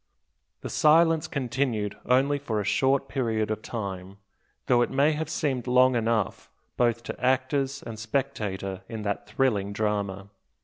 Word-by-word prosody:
The - - -5
silence 160 +1 +4
continued 120 -6 -1
only 135 +3 +3
for 115 -6 -2
a - - -1
short 135 +6 +2
period 110 -6 -1
of 110 0 -3
time, 100 -4 -6 0.5
though 120 -1 +4
it - - +1
may 140 +3 +3
have 155 0 -3
seemed 130 -6 -1
long 125 +1 +5
enough 115 -3 -1 0.3
both 120 -1 +1
to - - -7
actors 135 +2 +1
and 110 -2 -7
spectator 105 -6 -3
in 110 -2 -5
that 100 0 -3
thrilling 105 -4 0
drama. 100 -2 -2
120 Hz, 145 wpm, -26 LUFS, 105-135 Hz, 0.5 s, long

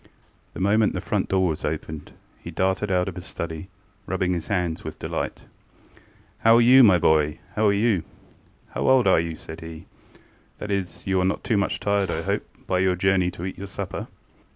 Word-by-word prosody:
The - - -6
moment 105 +3 +3
the - - -1
front - - -2
door 95 -1 +2
was 80 -3 -3
opened 80 0 -5 0.3
he - - -9
darted 95 +2 0
out 90 0 +2
of 95 - -5
his 90 - -8
study, 80 +1 -5 0.4
rubbing 90 0 0
his 85 -2 -3
hands 90 -5 -1
with - - -7
delight. - - -4 1.0
ŌĆ£How 115 0 +7
are 120 - +6
you, 130 +3 +8
my 100 -6 +7
boy? 75 -2 +2 0.2
ŌĆöhow 110 - +2
are - - +3
you? 100 -4 +2 0.7
How - - -1
old 130 -2 +5
are 95 -4 +5
you? 80 0 -2
ŌĆØ - - -10
said 80 +1 -9
heŌĆöŌĆ£that 80 +4 -13
is, 95 -4 -3
you 95 -1 +1
are - - +1
not 95 - -1
too 115 - +1
much 100 -1 0
tired, 100 -2 0
I 80 0 -2
hope, - - 0 0.2
by 90 - 0
your 95 -1 +2
journey 90 0 +2
to 90 0 -7
eat 95 - -6
your 100 - -6
supper? 95 - -5
95 Hz, 200 wpm, -24 LUFS, 85-100 Hz, 1.0 s, you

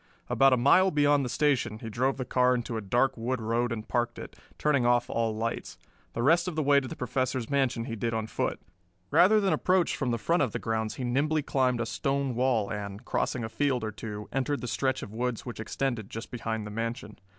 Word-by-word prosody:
About 135 0 +5
a 130 - +4
mile 180 +10 +5
beyond 145 -3 +3
the 125 - -3
station 140 -6 +1
he 115 - -8
drove 130 +5 0
the 130 - -3
car 125 0 +3
into 120 -1 -3
a 110 - -2
dark 120 +7 +1
wood 120 +2 -2
road 115 +2 0
and 110 -2 -4
parked 120 0 -1
it, - - -9 0.2
turning 145 -4 +2
off 120 0 +2
all 115 -1 0
lights. 115 +1 -3 0.4
The 115 - -2
rest 170 +6 +4
of 180 - -3
the 155 - 0
way 140 0 +5
to 130 - -6
the - - -6
Professor's 130 0 -2
mansion 130 -4 +1
he 115 - -4
did 115 +1 -2
on 110 -1 -2
foot. 110 - -2 0.5
Rather 215 +4 +6
than 195 -2 +2
approach 185 -1 +2
from 135 - -2
the 120 - 0
front 165 +9 +1
of 130 -7 0
the - - -1
grounds 110 -1 -2
he 130 - -5
nimbly 145 +5 +1
climbed 130 -3 +1
a - - -1
stone 135 +2 -1
wall 120 -4 +1
and, 100 +2 -6
crossing 120 - -1
a - - -2
field 130 -1 0
or 110 - -2
two, 105 0 -7
entered 135 +2 -1
the 125 - -4
stretch 130 +1 -1
of 105 - -9
woods 125 0 -2
which 120 -3 -7
extended 115 -1 -2
just 115 +1 -7
behind 110 -2 -3
the 105 - -7
mansion. 115 0 -4
125 Hz, 230 wpm, -28 LUFS, 115-135 Hz, 0.5 s, Rather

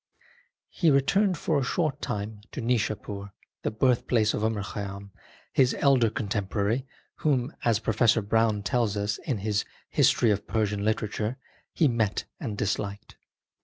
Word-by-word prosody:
He 170 - +2
returned 180 +7 +3
for 150 -1 +1
a - - 0
short 155 +2 -1
time 105 0 -4
to - - -5
Nishapur, 105 -4 -2 0.3
the - - 0
birthplace 115 -1 +2
of 105 - -2
Omar 110 -2 0
Khayyam, 100 +1 -6 0.4
his 130 -1 +3
elder 130 -5 +4
contemporary, 105 +4 -1 0.3
whom, 135 -2 +1
as 115 -3 +3
Professor 110 0 +2
Browne 110 0 +2
tells 105 0 0
us 105 +1 -1
in 130 - -2
his 105 +1 0 0.3
History 115 - +4
of 100 - -1
Persian 105 -2 0
Literature, 110 +2 -1 0.3
he 160 - +3
met 115 -5 0 0.2
and 110 -6 -4
disliked. 100 0 -3
110 Hz, 140 wpm, -27 LUFS, 105-125 Hz, 0.4 s, elder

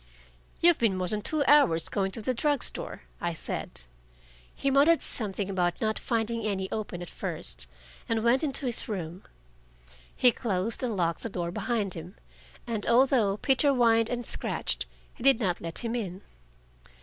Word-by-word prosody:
"You've 345 -1 +5
been 215 -5 +2
more 185 -1 -1
than 210 +3 -2
two 300 +6 0
hours 260 - +5
going 195 -1 -1
to 225 - -2
the 255 - +1
drug 290 +3 +1
store," - - -2 0.2
I 170 -1 -1
said. 155 - -5 0.7
He 275 - 0
muttered 295 +5 +5
something 205 -4 -3
about 180 -3 0
not 220 0 0
finding 230 -1 -1
any 190 -3 -2
open 195 -5 -4
at 175 - -8
first, - - -3 0.4
and 225 -1 +1
went 245 +5 +3
into 280 -2 -1
his 240 -2 0
room. 180 -3 -4 0.9
He 250 - +5
closed 215 -1 -1
and 235 -5 -2
locked 170 -2 0
the 230 - -3
door 175 -3 -3
behind 210 -1 -1
him, 175 +3 -8 0.5
and 225 -4 -1
although 235 -5 +4
Peter 270 +4 +3
whined 230 -3 +3
and 245 -1 -3
scratched, - - -1 0.3
he - - -16
did 270 -2 +5
not 185 -7 -1
let 165 -1 -6
him 230 0 -2
in. 195 -5 -4
220 Hz, 170 wpm, -28 LUFS, 185-250 Hz, 0.9 s, You've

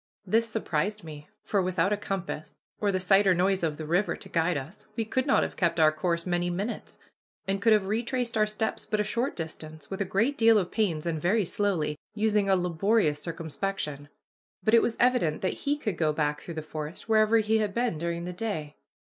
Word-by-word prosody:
This 225 +4 +2
surprised 210 -1 -2
me, 150 -2 -10 0.2
for 200 - +1
without 185 +1 +1
a - - +3
compass, 195 -6 -5 0.2
or 205 -1 +1
the 185 - 0
sight 195 +2 +4
or 185 - +5
noise 190 +2 +2
of 155 -3 -1
the 155 - -5
river 175 +6 +1
to - - -11
guide 165 0 +1
us, 140 +8 -8
we 225 - -1
could 260 +4 -1
not - - +4
have - - -4
kept 170 -2 +1
our 155 -1 +6
course 170 +2 -1
many 175 -1 0
minutes, 200 +7 -4 0.5
and 195 +1 -1
could 225 - +4
have 210 -3 +4
retraced 235 +3 -1
our 215 -1 +3
steps 215 +1 -2
but 215 - -2
a - - +3
short 235 +6 -1
distance, 155 -2 -7
with 195 - -3
a - - +4
great 225 +9 0
deal 225 -1 +6
of 180 -3 0
pains 175 -9 0
and 160 -3 -2
very 200 +5 +2
slowly, 165 -7 -1 0.2
using 210 -2 +2
a 190 - +5
laborious 180 -2 +1
circumspection. 160 -2 -4 0.5
But 220 - +2
it 230 - +8
was 230 - -1
evident 245 -12 +2
that 190 - -3
he 290 - +2
could 210 - -3
go 155 -2 +3
back 150 -1 -1
through 170 - -8
the 155 - -4
forest 155 +4 -6
wherever 220 0 +4
he 220 0 +2
had 210 -2 0
been 235 -9 0
during 170 +1 -2
the 180 +1 -5
day. 175 -7 -4
190 Hz, 215 wpm, -28 LUFS, 165-215 Hz, 0.5 s, it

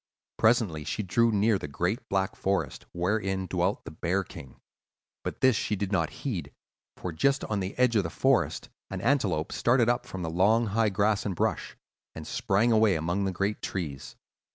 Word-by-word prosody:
Presently 110 -9 +3
she 105 - -3
drew 115 +5 +2
near 105 0 +2
the - - -5
great 90 - -2
black 95 -1 0
forest, 95 0 -2
wherein 95 +1 -1
dwelt 90 +2 -1
the - - -7
Bear 90 +5 -1
King. 65 -7 -12 0.6
But - - -5
this 130 -3 +5
she 105 - -1
did 100 0 -3
not 85 -5 +1 0.2
heed, 85 - -3 0.5
for 90 - -4
just 135 - +1
on 105 -2 -2
the 95 0 -4
edge 125 -2 +3
of 105 - +5
the 85 - -4
forest - - +1 0.2
an 95 - -4
antelope 100 - +1
started 120 -1 +3
up 120 0 0
from 95 -6 -6
the 80 - -3
long, 105 +7 +3
high 110 +1 +1
grass 100 +2 +1
and 100 -3 -2
brush, - - -2 0.4
and 80 - -7
sprang 115 +3 +1
away 110 -3 +4
among 85 +5 -1
the 95 - 0
great 100 +3 -2
trees. 70 -8 -5
100 Hz, 185 wpm, -28 LUFS, 90-110 Hz, 0.6 s, this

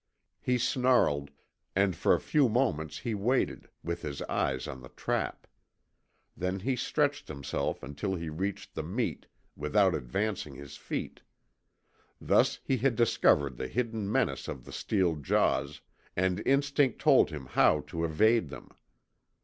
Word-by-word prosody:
He 125 0 +1
snarled, 120 - +2 0.5
and 95 -2 +2
for - - +3
a - - -2
few 145 -5 +2
moments 80 - 0
he 115 - -3
waited, 115 +6 0
with 85 0 -3
his 70 - -5
eyes 65 -1 -1
on 65 - -7
the 60 - -11
trap. - - -3 0.9
Then 90 +2 -2
he 130 +5 0
stretched 145 +3 0
himself 70 -2 -3
until 75 +8 -3
he 85 -2 -5
reached 95 +6 -4
the - - -3
meat, 90 - -3 0.3
without 75 0 +2
advancing 90 - -2
his 70 +1 -10
feet. - - -5 1.0
Thus - - +2
he 135 - +1
had 125 0 +1
discovered 70 - +3
the 65 - -3
hidden 115 - -2
menace - - 0
of 65 - -6
the - - -10
steel 90 -6 0
jaws, 70 0 +1 0.3
and 95 +2 +1
instinct 140 -1 +2
told - - +5
him 70 -3 -7
how 70 - +3
to 80 - -5
evade 90 +4 +3
them. - - -10
95 Hz, 145 wpm, -30 LUFS, 75-120 Hz, 1.0 s, told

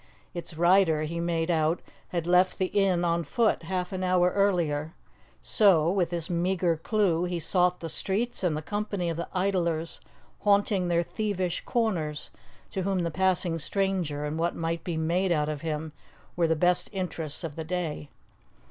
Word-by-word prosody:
Its 170 -1 -6
rider, 170 -2 +4
he 165 +2 -3
made 170 0 0
out, 160 +1 +2 0.3
had 170 -2 -3
left 180 +1 +3
the 190 - +1
inn 190 -3 +2
on 170 0 +1
foot 220 +9 +1
half 180 -1 -3
an 185 -1 -3
hour 180 -1 +3
earlier, 170 -6 +1 0.5
so, 175 -6 +4
with 180 -4 +1
this 170 -2 -2
meagre 175 -1 +1
clue, 180 0 +1
he 175 -1 -2
sought 180 +1 +1
the 165 - -4
streets 205 +7 -2
and 165 -4 +1
the 155 - -5
company 205 -2 -2
of 165 - -5
the 170 - -3
idlers 175 -4 -1 0.4
haunting 200 -2 +2
their 170 0 +2
thievish 185 -3 -2
corners, 170 -11 -1 0.4
to 190 - -2
whom 190 -1 0
the 170 - -1
passing 180 -1 +1
stranger 175 -4 -1
and 150 +2 -3
what 170 +1 0
might 165 0 -2
be 170 -3 -3
made 175 +4 +1
out 150 -2 +1
of 150 -2 -4
him 155 -1 -3 0.4
were 170 -1 +2
the 160 - +2
best 180 +2 +2
interests 175 -5 -4
of 160 -3 -5
the 160 - -4
day. 160 -3 -3
175 Hz, 175 wpm, -27 LUFS, 165-190 Hz, 0.5 s, rider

